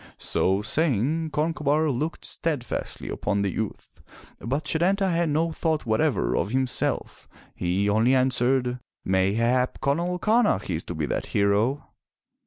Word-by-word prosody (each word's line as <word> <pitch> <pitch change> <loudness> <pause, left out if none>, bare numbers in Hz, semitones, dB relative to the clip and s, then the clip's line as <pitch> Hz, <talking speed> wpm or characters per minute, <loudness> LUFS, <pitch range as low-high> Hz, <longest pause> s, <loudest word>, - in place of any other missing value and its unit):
So 95 +2 0
saying, 155 +4 +1
Concobar 150 0 +1
looked 150 +6 -3
steadfastly 150 -7 -3
upon 100 -1 -1
the 100 - 0
youth, 110 +1 -6 0.4
but 140 +7 -2
Setanta 190 +4 +1
had 170 -1 +1
no 160 +3 +1
thought 160 -2 -1
whatever 110 - +1
of - - 0
himself. 130 +1 -1 0.3
He 90 +3 0
only 110 +5 +3
answered, 125 -1 +1 0.3
"Mayhap, 115 +7 +1
Conall 170 +6 0
Camach 215 - +2
is 80 - -4
to 90 - -5
be 80 -1 -1
that - - -3
hero." 105 +7 +1
130 Hz, 130 wpm, -25 LUFS, 105-160 Hz, 0.4 s, only